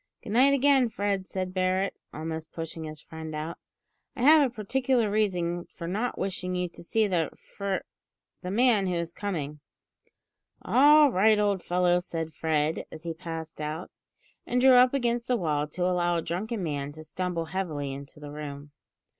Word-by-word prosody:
"Good 205 - -7
night 265 +5 +5
again, 270 -2 +4
Fred," 200 -3 -1
said 185 -1 -3
Barret, 185 +1 +1 0.2
almost 160 +1 -5
pushing 165 0 -6
his 155 -1 -8
friend 160 0 -8
out. 155 +2 -5 0.6
"I 240 - -3
have 305 +3 +8
a 270 -4 +2
particular 245 0 0
reason 175 -5 0
for 170 - -8
not 215 +8 -2
wishing 185 -1 -3
you 180 -1 -1
to - - -12
see 220 +5 +1
the 175 -6 0
fr, 200 -1 -4 0.7
the 180 - -5
man 215 -1 +3
who 180 - 0
is 170 -1 -2
coming 170 -8 -3
in." 150 - -16 1.0
"All 295 +2 +6
right, 215 +2 +4
old 205 -3 +1
fellow," 180 0 +2
said 165 -2 -5
Fred 155 0 0
as 155 - -9
he 165 -1 -3
passed 160 -1 -7
out, 155 +4 -4 0.6
and 250 - +1
drew 260 +1 +7
up 250 +2 +6
against 240 -2 0
the 250 - +2
wall 150 -5 0
to 180 +4 -2
allow 175 -1 +1
a 165 - -1
drunken 205 +4 -3
man 145 -3 -3
to 155 +1 -10
stumble 170 +1 -3
heavily 155 -7 -3
into 140 +2 -10
the 145 -1 -8
room. 145 -1 -7
180 Hz, 180 wpm, -28 LUFS, 160-215 Hz, 1.0 s, have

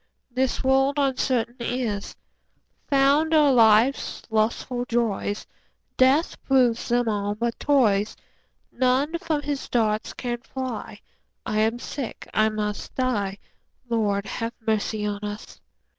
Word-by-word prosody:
This 255 +1 0
world 270 +2 +3
uncertain 255 -3 0
is: 235 -4 -3 0.7
Fond 285 +3 +3
are 295 -3 +5
life's 230 +3 +4
lustful 230 +3 0
joys, 225 -4 -1 0.5
Death 270 +6 +3
proves 250 -4 +2
them 240 0 +1
all 205 -1 -1
but 235 +2 -2
toys. 220 -8 +2 0.6
None 265 +6 +1
from 315 -4 -2
his 285 -1 -3
darts 220 -2 0
can 240 -1 -4
fly; 255 -5 -6 0.4
5 215 - -2
I - - +2
am 220 +2 +2
sick, 255 0 -6
I 215 0 +3
must 210 -1 -4
die— 205 -7 -1 0.5
Lord, 205 -3 0
have 230 +3 -4
mercy 215 -1 0
on 205 -1 -2
us! 210 +1 -7
240 Hz, 125 wpm, -24 LUFS, 215-265 Hz, 0.7 s, are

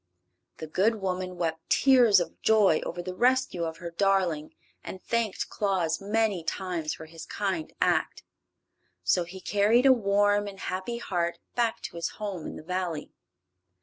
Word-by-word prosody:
The 160 - -6
good 195 +8 +2
woman 185 -2 -3
wept 165 -2 -3
tears 245 -7 +6
of 175 - -5
joy 205 -7 +4
over 175 - -5
the 185 +1 -5
rescue 245 -5 +1
of 160 0 -5
her 170 -1 -7
darling 180 -4 0 0.3
and 190 - -7
thanked 230 -1 -1
Claus 185 -6 -1
many 205 -3 0
times 170 -3 -3
for 160 - -10
his 160 0 -11
kind 190 -6 -2
act. - - +1 0.8
So 170 - +2
he 185 +2 -10
carried 210 +6 +3
a 265 - +8
warm 205 -2 +2
and 195 -1 -9
happy 190 +7 -3
heart 175 -6 -2 0.2
back 235 -2 0
to - - -6
his 170 - -1
home 200 -6 -4
in - - -7
the - - -9
Valley. 175 -3 -3
190 Hz, 160 wpm, -27 LUFS, 170-210 Hz, 0.8 s, a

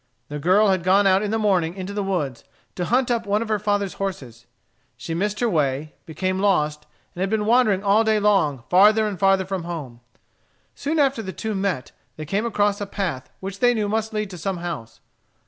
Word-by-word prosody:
The 150 0 -5
girl 190 +7 +4
had 190 -2 +2
gone 190 +3 +3
out 190 0 +4
in 210 - -2
the 220 - 0
morning 185 -6 +1
into 190 +1 -6
the 205 - -2
woods, 170 -11 -2 0.3
to 180 - -3
hunt 245 +5 +1
up 230 -2 -1
one 205 +2 +1
of 225 - -9
her 215 -1 +1
father's 205 -2 -1
horses. 125 -12 -5 0.5
She 165 - -5
missed 205 +5 -1
her 240 - +3
way, 150 - -1
became 185 +3 -2
lost, 150 -7 +1 0.3
and 180 - -7
had 190 - 0
been 215 0 0
wandering 220 -4 +3
all 205 +2 +4
day 220 -1 +2
long 185 - +2
farther 210 +4 +5
and 200 -4 -5
farther 195 -1 +3
from 190 -2 -4
home. 145 -9 -6 0.7
Soon 305 +3 -2
after 275 -5 +2
the 190 -3 -6
two 220 +3 -4
met 190 -10 -2 0.2
they 155 - -7
came 200 +8 -1
across 205 -2 0
a 205 - -3
path 170 -11 -4
which 195 +1 -6
they 245 +1 +4
knew 210 -2 0
must 220 +1 -1
lead 210 -2 -3
to 180 - -8
some 190 +3 -2
house. 170 -10 -6
195 Hz, 215 wpm, -23 LUFS, 170-210 Hz, 0.7 s, farther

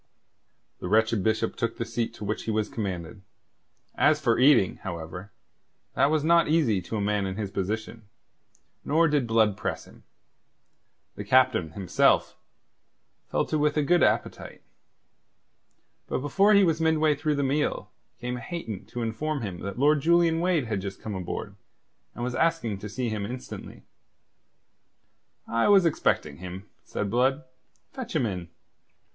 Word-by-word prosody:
The - - -5
wretched 110 +1 +2
Bishop 110 +1 0
took 115 -2 -2
the 115 - -2
seat 115 0 -2
to 105 - -7
which 105 +2 -3
he - - -3
was 110 -1 -1
commanded. 95 -3 -5 0.7
As 155 -1 +3
for 120 -6 +1
eating, 130 -8 +5
however, 90 +1 -7 0.6
that 140 - +3
was 155 -1 +1
not 170 +1 +4
easy 150 - +2
to 110 - -6
a - - -1
man 100 -1 0
in 95 - -4
his 100 -2 -4
position; 105 +2 -4 0.7
nor 165 +3 +3
did 145 -5 +1
Blood 110 -3 +3
press - - -4
him. - - -17 1.1
The 105 - -7
Captain, 125 -8 +3
himself, 85 -8 +2 0.9
fell - - 0
to 155 - -1
with 150 0 +1
a 150 - +3
good 175 +4 +3
appetite. - - -1 1.4
But - - -1
before 195 +9 +3
he 200 - +6
was 165 -3 +1
midway 160 -1 +3
through 150 +1 -1
the 140 - 0
meal 145 +3 -1 0.3
came 125 0 -4
Hayton 115 - -6
to 120 - -5
inform 135 +5 -2
him 95 -4 -5
that 100 +2 -6
Lord 145 +2 +3
Julian 170 +1 +3
Wade 170 -5 +1
had 105 -4 -2
just 95 0 -6
come 110 - -6
aboard, 100 +2 -5 0.6
and 120 - -5
was 125 0 -2
asking 145 -11 0
to 105 - -7
see 125 +3 -3
him 105 -2 -3
instantly. 125 +5 -8 1.6
"I 115 0 +1
was 200 -3 +6
expecting 75 - 0
him," 95 +2 -8 0.2
said 100 -1 -3
Blood. 130 +5 +2 0.5
"Fetch 255 -7 -6
him 140 -6 +2
in." 90 -5 -4
115 Hz, 155 wpm, -26 LUFS, 100-150 Hz, 1.6 s, he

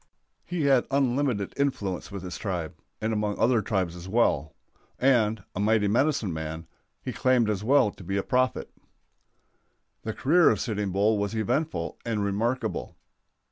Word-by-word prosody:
He 175 -3 -2
had 135 -3 +3
unlimited 130 -6 0
influence 105 -11 -2
with 100 -2 -6
his 90 -2 -6
tribe, 90 -7 -3 0.3
and 110 +1 -1
among 105 -1 -1
other 120 -1 +3
tribes 95 -4 -1
as 90 +1 -9
well; 85 -9 +1 0.4
and, 110 -6 +2
a - - -3
mighty 105 0 +3
medicine 120 - +1
man, 80 +1 -5 0.4
he - - -4
claimed 125 -4 +2
as 105 -1 -3
well 130 -2 +4
to 100 - -13
be 95 +3 -2
a 100 - 0
prophet. 130 0 0 1.3
The 110 - -4
career 170 +5 +4
of - - +1
Sitting 105 -4 -2
Bull 105 +3 +2
was 100 +2 -2
eventful 145 +9 -1
and 110 -3 -1
remarkable. 115 +4 -2
110 Hz, 155 wpm, -27 LUFS, 100-130 Hz, 1.3 s, well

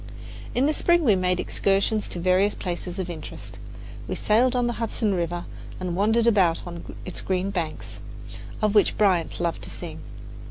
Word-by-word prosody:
In 255 - +3
the 305 - +2
spring 345 +2 +3
we 220 -8 +5
made 180 -1 +1
excursions 200 +2 +1
to 175 - -4
various 185 +3 +3
places 175 0 -4
of 185 -2 -2
interest. 165 -3 -8 0.5
We - - -2
sailed 240 +4 +3
on 245 -1 +2
the 240 - 0
Hudson 220 -2 0
River 175 -1 -2 0.3
and 180 -2 -2
wandered 220 +4 +3
about 190 -8 +3
on 170 -1 -8
its 185 - -5
green 190 +1 -1
banks, 170 -5 -4 0.6
of 210 -1 +3
which 210 - +4
Bryant 185 -6 +2
loved 170 -1 -1
to - - -5
sing. - - -7
190 Hz, 170 wpm, -25 LUFS, 175-220 Hz, 0.6 s, we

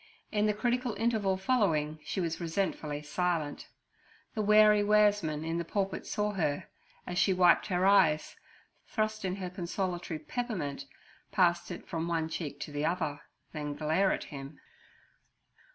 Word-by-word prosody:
In 210 -1 +2
the 210 - +2
critical 245 0 0
interval 215 -5 +1
following 170 -9 +1
she - - -3
was 165 -1 -2
resentfully 160 -4 -2
silent. 165 -2 -2 0.7
The 215 - -1
wary 210 0 +6
waresman 205 -7 +3
in 165 +1 -1
the - - -1
pulpit 195 +3 -2
saw 210 -1 0
her, 155 -7 -1 0.4
as 180 +1 -2
she 190 - +3
wiped 180 -2 +5
her 185 -2 +1
eyes, 160 -6 +4 0.5
thrust 215 -1 -1
in 185 -1 -1
her 185 -2 -5
consolatory 175 -2 -3
peppermint, 160 - -4 0.4
pass 175 -2 +2
it 175 - -7
from 165 -1 -3
one 165 -1 -1
cheek 145 -4 -5
to 145 - -5
the 145 0 -2
other, 160 -3 -1 0.3
then 150 -2 -4
glare 160 +6 +2
at - - -1
him. 140 0 -9
180 Hz, 150 wpm, -31 LUFS, 155-205 Hz, 0.7 s, wary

